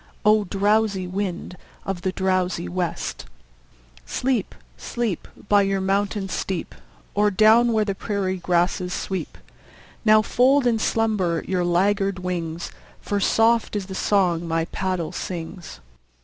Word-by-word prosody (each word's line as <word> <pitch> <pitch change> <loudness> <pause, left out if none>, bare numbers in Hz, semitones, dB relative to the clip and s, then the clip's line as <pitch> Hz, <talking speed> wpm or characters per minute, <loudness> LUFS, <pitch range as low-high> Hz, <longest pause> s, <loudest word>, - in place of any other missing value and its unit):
O! 210 0 +5
drowsy 200 0 +1
wind 185 -1 -4 0.3
of 195 -2 -3
the 185 - -1
drowsy 185 -2 0
west, 180 -1 -3 0.8
Sleep, 245 - -1 0.2
sleep, 235 -8 -3 0.2
By 205 0 +5
your 195 0 +1
mountain 195 +1 0
steep, 185 0 -3 0.4
Or 210 0 +3
down 220 +4 +5
where 215 -1 +2
the 200 - -1
prairie 190 -2 -2
grasses 180 +1 0
sweep! 190 -4 -4 0.7
Now 215 -1 +6
fold 260 +5 +3
in 235 -2 +2
slumber 210 -8 0
your 185 -2 0
laggard 195 +3 +1
wings, 175 -2 -4 0.3
For 205 - -2
soft 225 +3 +2
is 200 -2 -2
the 190 - -8
song 180 -4 +1
my 165 0 0
paddle 185 -2 -2
sings. 175 0 -6
195 Hz, 130 wpm, -23 LUFS, 180-210 Hz, 0.8 s, Now